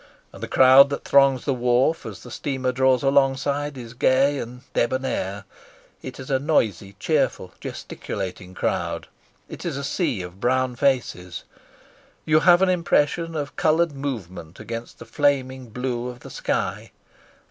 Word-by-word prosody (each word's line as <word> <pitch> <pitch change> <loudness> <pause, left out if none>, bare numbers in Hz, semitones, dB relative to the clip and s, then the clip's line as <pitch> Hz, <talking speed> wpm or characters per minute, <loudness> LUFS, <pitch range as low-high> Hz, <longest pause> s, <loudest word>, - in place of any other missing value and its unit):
And - - -12
the - - -4
crowd 130 +2 +7
that 140 - -4
throngs 135 -2 +4
the 140 - +1
wharf 125 +5 +1
as - - -9
the - - -11
steamer 130 -3 -2
draws 130 0 +2
alongside 140 +1 +1
is 120 -2 -9
gay 135 +3 +2
and 125 +1 -7
debonair; 115 -6 -1 0.6
it 130 0 -8
is 135 +2 -7
a 135 - +2
noisy, 105 - 0
cheerful, - - 0
gesticulating 95 0 -6
crowd. - - -2 0.4
It - - -9
is - - -3
a 140 - -4
sea 140 - -1
of 90 +2 -10
brown 130 +2 +1
faces. 115 -10 -1 0.8
You 155 0 +4
have 175 +2 +5
an 190 - +3
impression 165 -1 +1
of 145 -3 -4
coloured 160 +1 +2
movement 95 - -6
against 115 0 -7
the - - -11
flaming 130 -3 0
blue 125 +1 -3
of 125 0 -8
the - - -11
sky. - - -3
130 Hz, 150 wpm, -23 LUFS, 120-140 Hz, 0.8 s, crowd